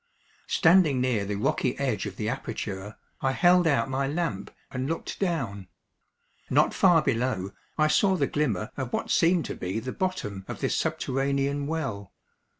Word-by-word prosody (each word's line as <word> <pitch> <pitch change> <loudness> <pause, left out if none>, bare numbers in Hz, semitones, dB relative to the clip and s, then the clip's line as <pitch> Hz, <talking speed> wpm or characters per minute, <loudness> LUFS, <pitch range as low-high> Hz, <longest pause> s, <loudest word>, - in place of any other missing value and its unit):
Standing 160 -6 +4
near 125 -5 +1
the 100 +1 -2
rocky 125 +3 0
edge 125 -8 -1
of 95 - -7
the 105 - -3
aperture, 105 -4 -4 0.3
I 135 0 +1
held 175 +2 +4
out 145 -3 +2
my 135 +1 -1
lamp 145 - -2 0.2
and 130 0 -3
looked 165 - -4
down. 115 - -2 0.8
Not - - +3
far 175 -4 +5
below 115 -7 -1 0.3
I 155 - +4
saw 190 +4 +3
the - - +1
glimmer 115 -8 -1
of 130 -3 -3
what - - -2
seemed 170 0 +3
to - - -5
be 95 +4 -3
the 130 +3 -5
bottom 115 - -3
of - - -6
this - - 0
subterranean 140 +1 -1
well. 135 - -4
135 Hz, 160 wpm, -27 LUFS, 105-160 Hz, 0.8 s, far